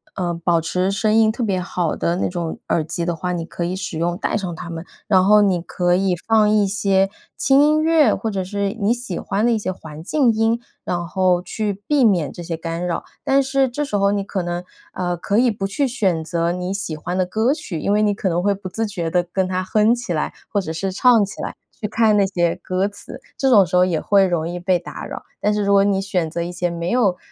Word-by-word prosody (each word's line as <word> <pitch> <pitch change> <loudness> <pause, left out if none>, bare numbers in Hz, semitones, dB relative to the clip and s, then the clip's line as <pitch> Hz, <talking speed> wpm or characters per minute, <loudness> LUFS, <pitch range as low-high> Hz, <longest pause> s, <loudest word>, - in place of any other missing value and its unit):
呃， 175 -2 -1
保 170 0 +1
持 180 +4 -1
声 215 +2 +1
音 220 -1 +5
特 235 - -6
别 195 -5 0
好 175 -3 -2
的 170 +1 -1
那 - - 0
种 170 -3 -4
耳 165 - +1
机 170 +2 -3
的 175 -1 -1
话， 180 +2 -3
你 170 -2 -3
可 170 - -5
以 175 +1 -2
使 185 -3 -4
用， 170 +2 -1
戴 - - -2
上 190 -5 -2
它 170 - -8
们。 165 0 -6 0.2
然 190 -3 +4
后 210 +2 +6
你 190 -4 +2
可 175 0 0
以 190 0 +1
放 220 -2 +4
一 210 -1 +3
些 195 -1 +2 0.3
轻 270 0 +4
音 305 +1 +4
乐， 315 -7 +4
或 225 - -2
者 195 -3 -2
是 200 +2 -2
你 205 +3 +3
喜 240 -7 -5
欢 205 +3 -1
的 240 - +3
一 - - +1
些 200 -3 -2
环 160 -4 -10
境 255 - +2
音， 225 +1 +1 0.2
然 175 -1 -2
后 185 -1 +2
去 205 +2 -3
避 295 -3 +3
免 185 -9 +2
这 175 - -8
些 165 -1 -4
干 165 +1 -4
扰。 170 -2 -3 0.2
但 275 +1 +3
是 270 0 +1
这 295 +5 -2
时 245 - -4
候 200 0 +3
你 205 0 0
可 195 -2 -3
能 175 0 -3 0.3
呃， 175 -1 -2
可 200 +4 -1
以 245 +1 +4
不 205 -3 -3
去 235 +8 0
选 195 -10 0
择 170 +1 -1
你 180 +1 -3
喜 190 -6 -4
欢 175 +4 -4
的 185 - +2
歌 220 +8 +1
曲， 255 - -5
因 200 - 0
为 210 - +3
你 210 -1 +2
可 200 0 -3
能 175 0 0
会 200 +1 +3
不 195 -1 -7
自 225 +5 -2
觉 175 -6 -3
地 175 +1 +2
跟 185 +2 -1
它 185 0 -1
哼 215 +4 +3
起 240 -6 -6
来， 155 - -2 0.2
或 205 - 0
者 160 - -5
是 190 +4 -2
唱 230 +1 +4
起 200 - -9
来， - - -5 0.3
去 210 - -1
看 220 0 +3
那 200 - +4
些 175 -3 0
歌 185 +2 0
词， 205 +5 -11 0.2
这 270 - +2
种 205 -6 +6
时 180 +1 -3
候 180 - +6
也 170 -4 0
会 200 -1 +4
容 170 -3 -1
易 175 +1 -4
被 180 +1 +2
打 175 - -8
扰。 - - -7 0.2
但 210 - +2
是 210 - 0
如 200 - +3
果 200 0 +6
你 200 -1 +2
选 185 -4 -1
择 170 - -3
一 175 - -5
些 175 0 -1
没 170 0 -3
有 205 -7 +2
190 Hz, 275 characters per minute, -20 LUFS, 175-215 Hz, 0.3 s, 后